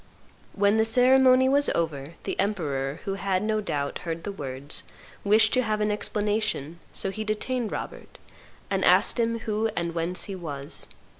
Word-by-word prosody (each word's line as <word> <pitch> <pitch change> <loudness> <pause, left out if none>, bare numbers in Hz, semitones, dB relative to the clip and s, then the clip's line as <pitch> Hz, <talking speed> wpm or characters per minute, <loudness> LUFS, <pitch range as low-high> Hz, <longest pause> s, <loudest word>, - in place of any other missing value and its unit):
When 205 +1 +3
the 220 - +4
ceremony 255 +2 +5
was 285 +2 +3
over, 160 -2 -2
the - - -4
emperor, 145 -8 -1
who 195 - -1
had, 195 -1 -1
no 215 0 0
doubt, 145 -7 -3
heard 165 -1 -5
the 205 - -3
words, 140 -5 -5 0.4
wished 210 +2 +5
to 255 - +4
have 215 -3 -1
an 210 0 +1
explanation; 210 -7 -2
so 195 - -3
he 215 +2 -4
detained 215 +2 -2
Robert, - - -7 0.5
and - - +1
asked - - +4
him 230 0 +1
who 220 0 -1
and 170 -1 -2
whence 170 +2 -1
he 200 - -6
was. 145 -6 -6
205 Hz, 165 wpm, -26 LUFS, 165-220 Hz, 0.5 s, ceremony